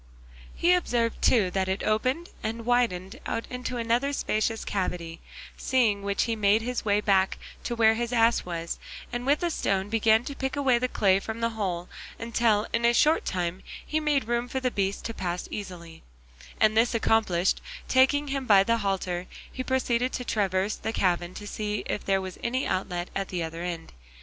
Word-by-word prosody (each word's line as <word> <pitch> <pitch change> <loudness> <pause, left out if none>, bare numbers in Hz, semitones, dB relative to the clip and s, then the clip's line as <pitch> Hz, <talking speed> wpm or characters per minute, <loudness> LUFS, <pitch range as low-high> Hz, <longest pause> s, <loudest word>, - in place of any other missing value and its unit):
He 350 +1 +4
observed 240 -10 0
too 205 -7 +4
that 190 0 0
it 190 - -1
opened 255 +10 0
and 225 +1 -4
widened 230 -7 0
out 230 - -2
into 250 0 -4
another 240 +5 +1
spacious 220 -3 -1
cavity; 175 -4 -3 0.4
seeing 225 -6 +2
which 200 0 0
he 230 - -1
made 210 +1 +3
his 250 +1 -2
way 205 0 +2
back 190 -2 +2 0.3
to 240 - -2
where 220 -1 +5
the 240 +2 -2
ass 230 0 +4
was, 170 -1 -4 0.3
and 245 +1 -3
with 295 +5 +3
a 345 - +1
stone 195 -8 0
began 220 +1 +3
to 280 - -5
pick 265 0 -3
away 265 -4 +3
the 255 - 0
clay 195 -5 +3
from 220 +3 -6
the 230 0 0
hole 185 -5 -3 0.3
until 230 -2 +1
in 230 - +1
a 235 0 +4
short 310 +6 +4
time 180 0 -2 0.2
he 310 - -1
had 310 - -1
made 280 -6 +2
room 240 +1 0
for 265 +1 -2
the 255 -1 0
beast 195 -1 -2
to 230 - -3
pass 180 -3 -3
easily, 170 -5 -7 0.6
and 215 0 +4
this 230 +2 +3
accomplished, 215 -6 +2 0.3
taking 280 +3 +3
him 270 -2 -2
by 200 -3 +7
the 230 +3 +2
halter, 185 -3 -2 0.2
he 255 - -4
proceeded 255 -1 0
to 250 - -3
traverse 195 -1 0
the - - -3
cavern 175 -2 0
to 205 - -7
see 210 0 -3
if - - -3
there 195 -1 +2
was 185 -1 -7
any 255 +3 0
outlet 180 -1 -2
at 195 0 -1
the 180 -2 -3
other 165 +1 -5
end. 175 -2 -5
220 Hz, 195 wpm, -27 LUFS, 190-245 Hz, 0.6 s, by